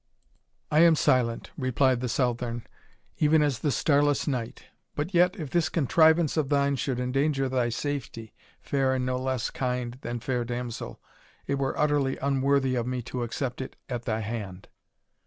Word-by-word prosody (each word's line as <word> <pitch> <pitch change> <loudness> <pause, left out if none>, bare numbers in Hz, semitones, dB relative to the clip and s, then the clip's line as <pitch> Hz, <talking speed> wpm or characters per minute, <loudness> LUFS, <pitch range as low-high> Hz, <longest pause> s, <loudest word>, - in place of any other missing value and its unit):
"I 150 - +4
am 165 -1 +7
silent," 125 -6 +1
replied 130 -1 +2
the 125 - -2
Southron, 120 -2 -1 0.5
"even 155 0 +4
as 145 -5 0
the 150 - 0
starless 145 +2 +2
night 125 -5 -3 0.3
but 155 +6 -3
yet 180 +1 +4
if 150 -5 -5
this 170 -1 +2
contrivance 160 +1 +3
of 150 -4 +1
thine 140 -1 +2
should 130 -1 -2
endanger 135 +2 0
thy 125 -2 0
safety, 120 -3 -4 0.3
fair 135 -2 +1
and 130 -1 -1
no 125 0 -1
less 130 -2 -2
kind 125 -1 -3
than 120 0 -4
fair 125 0 -1
damsel, 120 -1 -5 0.5
it 140 0 -1
were 135 -1 -1
utterly 145 -3 +1
unworthy 135 -1 +1
of 120 -1 -1
me 125 -1 -2
to 125 +1 -5
accept 125 +2 -3
it 130 - -7
at 120 -2 -4
thy 110 0 -1
hand." 105 -4 -6
130 Hz, 165 wpm, -27 LUFS, 120-145 Hz, 0.5 s, am